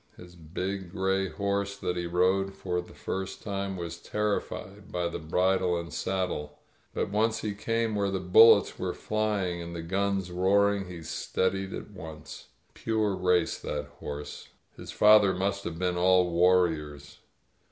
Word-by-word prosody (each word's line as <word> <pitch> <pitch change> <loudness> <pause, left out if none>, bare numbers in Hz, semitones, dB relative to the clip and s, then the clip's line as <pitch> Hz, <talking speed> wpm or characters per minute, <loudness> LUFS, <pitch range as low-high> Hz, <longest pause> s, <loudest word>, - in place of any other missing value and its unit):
His 90 0 -13
big 90 +3 -5
gray 95 0 0
horse 100 0 -2
that 90 -3 -2
he 85 -1 -2
rode 95 +3 +1
for 90 -2 -2
the 90 - -15
first 95 0 -5
time 100 -2 -3
was 85 -1 -6
terrified 105 -1 -3
by 90 -1 -1
the 85 - -5
bridle 90 +2 +1
and 85 0 -8
saddle. 75 -6 -2 0.3
But - - -2
once 110 +2 +1
he 105 -1 -2
came 115 +2 -1
where 100 -1 0
the 95 -1 -1
bullets 100 +5 +6
were - - -2
fljjlpg 105 -5 -1
and 85 0 -7
the 85 - -5
guns 95 +1 -1
roaring, 100 +2 +2
he 85 -2 -8
steadied 95 +3 -1
at - - -8
once. 75 -1 -10 0.3
Pure 110 -3 -1
facc^ 90 -2 +1
that 75 0 -3
horse.. 75 0 -7 0.3
•. - - -35
His - - -9
fathers 105 -3 +5
must 100 +1 -1
have 80 -1 -4
been 90 0 -1
all 90 0 +4
war 90 +1 +5
riors. 75 -3 -7
95 Hz, 165 wpm, -28 LUFS, 85-100 Hz, 0.3 s, bullets